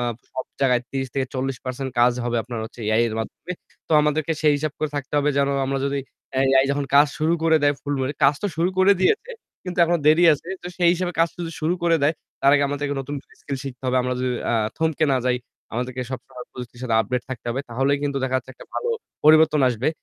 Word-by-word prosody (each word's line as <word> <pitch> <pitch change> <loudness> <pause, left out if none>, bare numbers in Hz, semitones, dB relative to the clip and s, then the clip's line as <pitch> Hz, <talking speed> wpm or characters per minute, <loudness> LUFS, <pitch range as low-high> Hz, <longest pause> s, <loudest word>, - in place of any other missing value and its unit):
আ - - -1 0.3
সব 130 - -4 0.2
জায়গায় 125 -3 +3 0.2
৩০ 135 - -2
থেকে 135 -1 0
৪০% 130 0 -3
কাজ 120 +1 +5
হবে 120 0 -1
আপনার 120 0 -6
হচ্ছে 115 - -11
AI 115 - +4
এর 110 - -5
মাধ্যমে। 175 +9 -6 0.4
তো - - -1
আমাদেরকে 150 +1 +1
সেই 150 - +5
হিসাব 150 0 -2
করে 155 - -1
থাকতে 140 -1 -5
হবে 145 +1 +2
যেন 140 0 +3 0.2
আমরা 135 0 -1
যদি 140 0 -1 0.3
অ্যা 130 - 0
AI 135 0 +6
যখন 140 0 0
কাজ 145 +1 +8
শুরু 160 +2 +2
করে 160 -1 +4
দেয় 145 0 +4
ফুলভাবে, 140 -1 -1
কাজ 140 +1 +6
তো - - +1
শুরু 175 +3 +2
করে 190 +2 +6
দিয়েছে 450 - +2 0.3
কিন্তু 180 -1 -5
এখনো 170 0 +1
দেরি 155 +3 +6
আছে। 150 +4 -4
তো - - -7
সেই 175 -2 +4
হিসাবে 180 0 -2
কাজ 165 0 +4
যদি 170 -2 -4
শুরু 160 +3 +1
করে 170 -1 +4
দেয় 150 +3 +3 0.3
তার 140 - +5
আগে 145 - +3
আমাদেরকে 145 0 -2
নতুনকরে 140 +1 -7
স্কিল 140 -1 -4
শিখতে 130 -2 -8
হবে। 130 0 +1
আমরা 125 0 -1
যদি 130 - 0 0.2
আ - - +2 0.2
থমকে 160 -1 +1
না - - +3
যাই 125 - +2 0.4
আমাদেরকে 125 +2 -3
সবসময় 125 -1 -8
প্রযুক্তির 120 -1 -9
সাথে 120 -3 0
আপডেট 120 +3 -2
থাকতে 125 -3 -6
হবে, 130 +3 -2
তাহলেই 135 +4 +1
কিন্তু 140 -1 -1
দেখা 130 0 0
যাচ্ছে 130 +1 -12
একটা - - -13
ভালো 470 - -2 0.4
পরিবর্তন 155 0 +6
আসবে। 120 +2 0
140 Hz, 230 wpm, -23 LUFS, 130-155 Hz, 0.4 s, কাজ